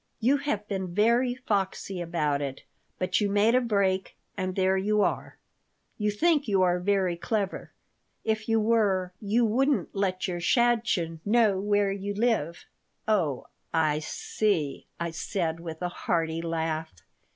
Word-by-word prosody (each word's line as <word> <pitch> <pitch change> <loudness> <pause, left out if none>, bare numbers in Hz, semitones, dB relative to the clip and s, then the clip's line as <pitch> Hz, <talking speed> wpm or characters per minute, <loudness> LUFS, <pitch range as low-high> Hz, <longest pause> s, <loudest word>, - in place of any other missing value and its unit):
You 255 +5 +3
have 215 -8 -2
been 190 -4 -4
very 235 +4 +3
foxy 195 -6 -2
about 150 -4 0
it, 135 -2 -5 0.3
but 185 +4 0
you 205 - +1
made 205 +3 +3
a 255 - +4
break, 200 -5 0 0.2
and 185 -1 -3
there 190 0 +2
you 210 +2 +2
are! - - -2 0.6
You 210 0 +1
think 295 +6 +2
you 195 -3 +3
are 180 0 +2
very 190 -1 +1
clever. 200 +2 -3 0.5
If 220 0 -1
you 225 0 +3
were 205 -5 +2
you 220 +3 +2
wouldn't 265 +6 +1
let 190 -2 -1
your 175 -2 -3
shadchen 215 -6 +1
[note] 220 -1 +4
know 190 - -2
where 205 0 +2
you 200 +1 -4
live 205 -8 0 0.2
" - - -48
Oh, 170 -12 +1 0.3
I 155 -2 +2
see," 160 -1 -2
I 170 0 -2
said, 165 -1 -2
with 165 0 -7
a 175 - 0
hearty 165 -2 -1
laugh. 160 -1 -2
195 Hz, 155 wpm, -27 LUFS, 175-220 Hz, 0.6 s, a